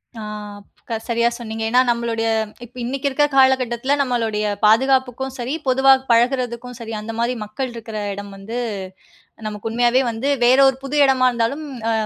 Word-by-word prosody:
ஆ 225 - -7 0.7
க 225 - -1
சரியா 235 0 +2
சொன்னீங்க. 225 -2 -5
ஏன்னா, 250 +2 +4
நம்மளுடைய 235 -1 0 0.4
இப்ப 245 +2 -21
இன்னைக்கு 270 +3 -2
இருக்கிற 295 +2 +2
காலகட்டத்தில 260 0 +3
நம்மளுடைய 225 -5 -1 0.2
பாதுகாப்புக்கும் 260 +3 +2
சரி, 245 +3 -3
பொதுவா 265 +1 +6 0.2
பழகுறதுக்கும் 245 0 +1
சரி, 225 -1 -7
அந்த 225 +2 -6
மாதிரி 235 +2 +1
மக்கள் 245 +4 -4
இருக்கிற 225 -2 -7 0.2
இடம் 200 0 -8
வந்து 220 +5 -6 0.9
நமக்கு 210 +1 -5
உண்மையாவே 240 +2 +3
வந்து 230 +5 -3 0.2
வேற 255 +2 +5
ஒரு 265 - 0
புது 285 +2 -3
இடமா 260 -2 +4
இருந்தாலும், 240 +6 -1 0.3
அ - - +2
240 Hz, 155 wpm, -20 LUFS, 225-260 Hz, 0.9 s, பொதுவா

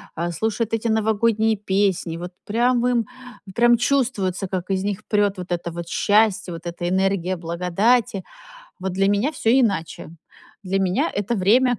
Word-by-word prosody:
Э, 170 +1 -2
слушают 220 +4 -2
эти 225 +1 0
новогодние 220 0 +2
песни, 190 -4 0
вот 175 +1 -7
прям 240 +3 +1
им, 240 -3 +1 0.5
прям 240 +1 +4
чувствуется, 225 -8 0
как 185 0 -4
из 190 0 0
них 205 -2 -3
прёт 205 -2 +1
вот 180 0 -7
это 170 0 -2
вот 170 0 -6
счастье! 205 -1 +2
Вот 165 +1 -9
эта 175 0 -4
энергия 190 -1 0
благодати. 185 +6 0 0.6
Вот 190 0 -3
для 195 +2 +2
меня 205 +10 +1
всё 225 -5 0
иначе. 205 -13 +1 0.5
Для 195 +1 -1
меня 185 0 +1
это 205 +4 -1
время 240 +6 +3
200 Hz, 160 wpm, -22 LUFS, 180-225 Hz, 0.6 s, прям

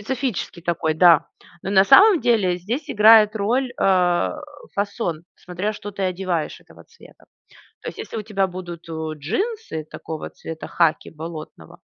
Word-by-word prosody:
Специфический 245 -5 -3
такой, 165 -2 -1
да. 165 -1 +5 0.4
Но, 195 - -4
на 190 -1 +5
самом 390 - +7
деле, 200 -7 +2
здесь 235 - -4
играет 215 0 +6
роль, 240 +5 0
а, 180 - +2 0.4
фасон. 200 -5 -3
Смотря 180 +4 -4
что 205 -1 -8
ты 200 0 -6
одеваешь 185 -3 -2
этого - - -18
цвета. - - -19 0.6
То - - -6
есть - - -8
если - - -7
у - - -4
тебя 200 -2 0
будут, 175 -2 -9
у, 160 -1 -4
джинсы 175 - -3
такого 160 -1 -7
цвета, 160 -1 -8
хаки, 165 -3 +1
болотного 155 - -10
185 Hz, 150 wpm, -22 LUFS, 165-215 Hz, 0.6 s, самом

